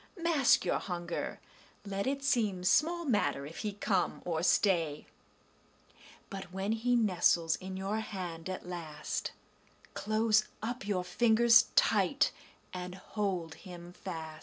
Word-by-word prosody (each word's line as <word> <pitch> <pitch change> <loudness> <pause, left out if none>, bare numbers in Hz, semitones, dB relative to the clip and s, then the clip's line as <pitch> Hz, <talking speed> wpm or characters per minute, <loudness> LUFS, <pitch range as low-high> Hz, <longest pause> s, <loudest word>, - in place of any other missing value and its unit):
Mask 330 -6 +3
your - - +1
hunger; 175 -2 -4 0.5
let 200 +1 -2
it 275 +1 -1
seem 215 -10 +1
Small 335 - +2
matter 205 - +1
if 155 +3 -9
he 210 -1 -3
come 195 -2 -1
or 165 -2 -1
stay; 165 -5 +2 1.3
But 195 -1 -5
when 190 +2 -2
he 240 +2 +1
nestles 175 -6 +3
in 190 0 -7
your 195 +3 -2
hand 180 -6 -5
at 185 -1 -5
last, 160 -4 -4 0.6
Close 215 0 +2
up 230 -1 -4
your 190 -3 0
fingers 230 +4 +5
tight - - +3 0.4
and 180 0 -5
hold 190 -4 -3
him 175 -2 -10
fast. 160 -4 -7
190 Hz, 130 wpm, -32 LUFS, 175-220 Hz, 1.3 s, fingers